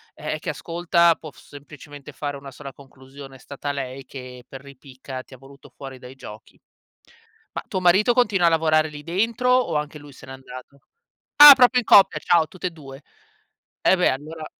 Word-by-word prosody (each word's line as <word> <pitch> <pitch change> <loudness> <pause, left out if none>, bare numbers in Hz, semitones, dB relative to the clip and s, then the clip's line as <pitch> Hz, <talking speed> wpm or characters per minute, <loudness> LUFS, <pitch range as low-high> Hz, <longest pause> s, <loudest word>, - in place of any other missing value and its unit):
ehm, 155 0 -6
che - - -7
ascolta 170 0 +1
può 155 -1 -12
s - - -21
semplicemente 145 0 -13
fare 145 +1 -6
una 140 0 -12
sola 135 +1 -11
conclusione, 135 0 -15
è 130 - -16
stata 145 0 -7
lei 135 -1 -7
che, 125 -1 -11
per 135 - -12
ripicca, 130 -1 -11
ti 130 - -19
ha - - -17
voluto 135 +2 -18
fuori 135 -2 -11
dai 125 +1 -13
giochi. 110 -5 -14 0.9
Ma, - - -6
tuo 185 - -4
marito 190 +7 +3
continua 205 -8 +1
a - - +5
lavorare 160 -1 +1
lì 150 -1 -11
dentro 230 - -2
o 255 -9 +1
anche 150 0 -4
lui 145 -1 -15
se - - -15
n'è - - -12
andato? 130 +1 -13 0.6
Ah 295 0 +11
proprio 250 -1 +4
in - - -11
coppia, 195 -3 +5
ciao, 170 -2 +2
tutt 185 +3 -16
e 180 - -1
2. 140 -4 -14 0.8
E 190 - +3
beh, 180 - +2
allora 155 +4 -7
145 Hz, 195 wpm, -21 LUFS, 135-170 Hz, 0.9 s, Ah